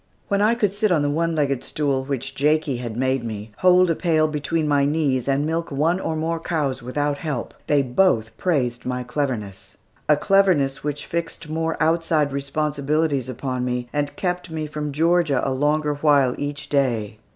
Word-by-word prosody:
When 200 -1 +2
I 220 +3 +4
could 205 -5 +1
sit 210 0 +1
on 155 -4 +3
the 145 - +1
one 165 +2 0
legged 140 -4 0
stool, 140 -3 -1
which 135 -1 -3
Jakie 150 -1 +1
had 120 -2 -5
made 130 0 0
me, 110 -1 -6
hold 180 -1 +5
a - - +1
pail 160 -3 +2
between 155 +1 -1
my 145 -1 +3
knees 140 -4 0
and 140 +1 +1
milk 165 +2 -2
one 160 +6 +1
or 160 - -2
more 165 +1 -1
cows, 145 -6 -2
without 145 +4 -2
help, 150 -7 -4
they 145 -2 +3
both 125 - +1
praised 125 -9 -1
my 125 0 -3
cleverness 125 -7 -4 0.3
a 150 - +6
cleverness 180 -8 +2
which 145 0 -3
fixed 165 -1 -4
more 160 +1 -1
outside 160 -3 +2
responsibilities 140 0 -1
upon 130 0 -3
me, 125 -1 -2
and 145 -1 -1
kept 180 -1 -2
me 160 -1 -3
from 150 0 -4
Georgia 160 -2 +2
a 135 - 0
longer 150 +2 +1
while 145 -3 +3
each 145 0 -4
day. 120 -7 0
145 Hz, 180 wpm, -22 LUFS, 130-160 Hz, 0.3 s, a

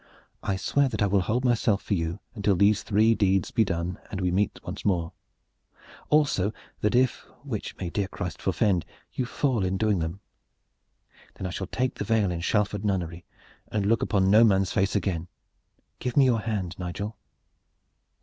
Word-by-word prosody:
I 95 - -1
swear 135 +8 +1
that 115 - -1
I - - +4
will 100 -1 +2
hold 120 +8 0
myself 115 -4 +2
for - - -2
you 85 +1 -2
until 100 -3 +1
these 100 +3 +4
three 110 +2 +3
deeds 95 -4 +1
be 115 - +3
done 85 -2 -3
and 95 - -4
we 90 -2 0
meet 100 +3 0
once - - -6
more; 85 -4 0 1.0
also 140 -10 +3 0.3
that 105 +2 +1
if 130 0 +2 0.2
which - - -5
may 85 - -4
dear 100 -2 -1
Christ - - -6
forfend! 95 -6 +1 0.3
you 125 - -2
fall 125 -6 0
in 95 +1 0
doing 105 -2 +2
them 80 +4 -3 1.2
then - - -6
I 90 - -3
shall 95 +1 -4
take 130 +6 -1
the - - -4
veil 105 -3 +2
in 85 -1 -3
Shalford 105 +2 0
nunnery 90 -4 -2 0.5
and 105 -2 0
look 115 +3 +2
upon 95 -2 +2
no 110 +2 +7
man's 95 -4 +3
face 100 +2 +1
again! 90 -4 -1 0.7
Give 125 - -3
me 140 - +7
your 120 -3 +3
hand, 100 -6 -3
Nigel." 100 +5 -4
100 Hz, 180 wpm, -26 LUFS, 95-110 Hz, 1.2 s, no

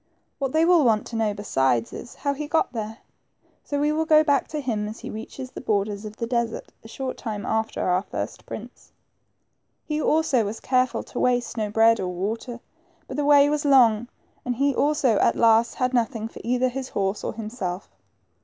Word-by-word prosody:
What 270 -2 -1
they 315 +3 +3
will 345 -3 +5
want 220 -4 +2
to 235 - -7
know 220 -2 0
beside 130 - 0
is, 240 - -9
how 280 -1 -1
he 295 +1 -5
got 310 -4 +1
there; 220 -1 -5 0.7
so 285 - -2
we 295 +1 +2
will 320 +1 0
go 310 -1 +6
back 285 -3 +2
to 305 - -4
him 220 -7 -2
as 215 - -8
he - - -6
reaches 250 +4 -7
the - - -8
borders 205 -2 -1
of 210 0 -8
the 230 - -2
desert, 235 -1 -2
a - - -11
short 260 +3 -5
time 215 -3 -5
after 220 0 -1
our 180 0 +2
first - - -6
prince. - - -10 0.9
He 305 0 -2
also 305 -7 +2
was 210 +2 -4
careful 255 -1 +1
to - - -7
waste 245 -1 +1
no 215 -3 -2
bread 225 +2 +4
or 185 - -2
water, 220 +7 -4 0.5
but - - -6
the 290 - -1
way 285 -1 +6
was 295 0 0
long, 240 -5 +5 0.4
and 250 -1 -2
he 280 +3 +2
also 275 -6 +2
at - - +3
last 230 0 +4
had 255 0 0
noth 240 +1 +1
ing 225 0 -4
for - - -11
either 250 +2 +1
his 260 +1 -5
horse 195 +1 -2
or - - -3
himself. 210 -5 -5
235 Hz, 205 wpm, -24 LUFS, 215-275 Hz, 0.9 s, go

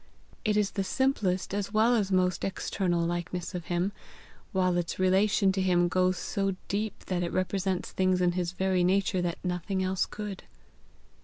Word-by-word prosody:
It 210 -2 +2
is 205 -2 +2
the 195 - -1
simplest 195 -6 0
as 200 0 -2
well 225 +3 +4
as 200 -4 0
most 185 -2 +2
external 185 -2 -1
likeness 175 +1 -3
of 175 -2 -5
him, 175 +3 0 0.6
while 185 -3 +2
its 175 -1 -2
relation 190 +1 +3
to 190 0 -1
him 175 -2 +3
goes 185 +1 +2
so 195 -1 -1
deep 210 +2 -3
that 180 -2 -1
it 170 - -2
represents 185 0 -1
things 185 -1 +2
in 180 -1 +3
his 175 0 -2
very 185 -1 +1
nature 190 0 +2
that 175 -1 -2
nothing 180 +2 -1
else 185 0 0
could." 210 -2 -6
185 Hz, 170 wpm, -29 LUFS, 180-195 Hz, 0.6 s, well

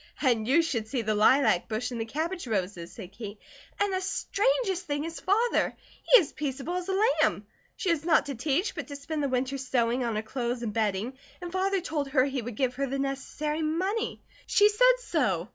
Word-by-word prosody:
"And 235 -6 +2
you 310 +6 +4
should 230 -9 -2
see 240 0 -2
the 215 0 0
lilac 215 -2 +4
bush 225 +3 -2
and 235 -2 -3
the - - -2
cabbage 325 +5 -3
roses," 185 -5 -2
said 190 -5 -10
Kate. 205 0 -8 0.4
"And 405 -1 +1
the 375 - 0
strangest 395 0 0
thing 290 0 -1
is 330 0 -6
Father. 445 +5 +1 0.2
He - - +7
is 320 - -2
peaceable 285 +3 -3
as 365 +1 -5
a 385 0 +1 0.2
lamb. - - +1 0.3
She 385 -7 0
is 320 -3 0
not 325 -1 +4
to 280 - -4
teach, 290 - 0
but - - -6
to 285 - -7
spend 300 +2 -4
the 280 - 0
winter 260 +2 -1
sewing 250 -1 0
on 230 -2 -1
her 215 - -1
clothes 240 +1 -3
and 215 -3 -3
bedding, 220 +4 -1 0.2
and 350 -1 -6
Father 380 +1 +1
told 305 -5 -2
her 265 -2 +3
he 270 -2 -2
would 235 0 -6
give 255 +1 0
her 275 0 0
the 270 +1 -2
necessary 275 +3 -2
money. 370 +8 -1 0.2
She 415 0 +5
said - - +5
so. 215 - 0
275 Hz, 210 wpm, -28 LUFS, 235-350 Hz, 0.4 s, He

